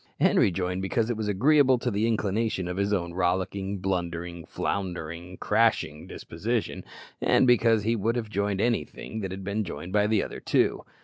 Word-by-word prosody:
Henri - - +4
joined 90 0 -2
because 110 +4 0
it - - -1
was 110 -1 -3
agreeable 130 +6 +4
to 120 +1 -2
the 105 +2 +1
inclination 110 -3 0
of 90 - -3
his 100 +1 0
own 85 -4 -1
rollicking, 95 +2 -1
blundering, 85 -2 -3
floundering, 90 -2 -4
crashing 75 +1 +1
disposition, 110 +7 -3 0.4
and - - +4
because 115 -3 +4
he 115 +2 +1
would 115 +2 0
have 120 -3 -2
joined 100 -1 -1
anything 115 -1 -2
that 95 -3 -3
had 95 +1 -6
been 100 +3 -1
joined 85 0 -7
by 105 0 +3
the 110 -1 +2
other - - -6
two. - - +1
100 Hz, 175 wpm, -27 LUFS, 90-110 Hz, 0.4 s, Henri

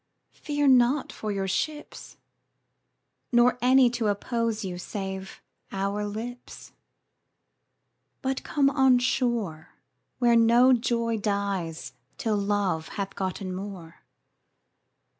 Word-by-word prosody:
Fear 290 -1 -1
not 255 +2 +3
your 200 -3 -2
ships, 295 +10 -4 1.1
Nor 245 0 +4
any 255 +1 +5
to 235 -2 -1
oppose 225 +1 -1
you 180 -1 -5
save 190 0 -6 0.3
our 200 +2 -2
lips; 235 +4 -8 1.5
But 265 0 -2
come 275 -2 +2
on 265 -2 +4
shore, 235 -10 -1 0.4
Where 240 -2 +3
no 235 +3 +6
joy 230 -1 0
dies 200 -5 -3 0.2
till 225 -6 0
Love 200 -5 -1
hath 195 -1 -3
gotten 190 0 -4
more. 185 -4 -8
220 Hz, 100 wpm, -26 LUFS, 195-245 Hz, 1.5 s, no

